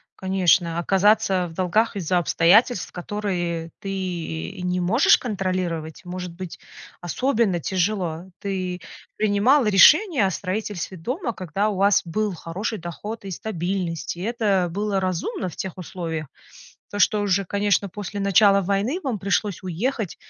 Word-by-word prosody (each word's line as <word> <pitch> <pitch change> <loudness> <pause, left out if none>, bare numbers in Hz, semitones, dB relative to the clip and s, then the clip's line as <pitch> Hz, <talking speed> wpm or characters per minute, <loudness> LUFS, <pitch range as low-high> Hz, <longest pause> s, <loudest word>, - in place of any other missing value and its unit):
конечно, 180 -3 +2
оказаться 195 0 +3
в 165 - -11
долгах 190 +6 +1
из-за 180 -2 0
обстоятельств, 180 - +3
которые 175 -3 -3
ты 195 - -6
и 185 0 -4
не 180 0 0
можешь 205 +10 +5
контролировать, 185 -7 -3
может 180 0 -5
быть 180 0 -8 0.4
особенно 215 - 0
тяжело. 180 -2 -1 0.2
Ты 185 -2 -3 0.3
принимала 215 +5 +3
решение 280 - +6
о 190 - +1
строительстве 190 -1 -4
дома, 250 - -3
когда 195 +3 -1
у 205 - -3
вас 200 +1 +4
был 210 +4 -2
хороший 190 +6 -4
доход 205 +7 -7
и 195 - -5
стабильность, 175 -3 -3
и - - -7
это 205 -5 +1
было 200 +1 -1
разумно 185 0 -2
в - - -12
тех 190 -2 -5
условиях. 165 -4 -5 0.6
То 205 - -5
что 210 +2 +4
уже, 200 -1 +1
конечно, 200 +1 +1
после 205 +1 -6
начала 200 0 +5
войны 200 - 0
вам 255 -8 -2
пришлось 200 -1 -1
уехать, 200 +3 -2
190 Hz, 140 wpm, -23 LUFS, 175-210 Hz, 0.6 s, решение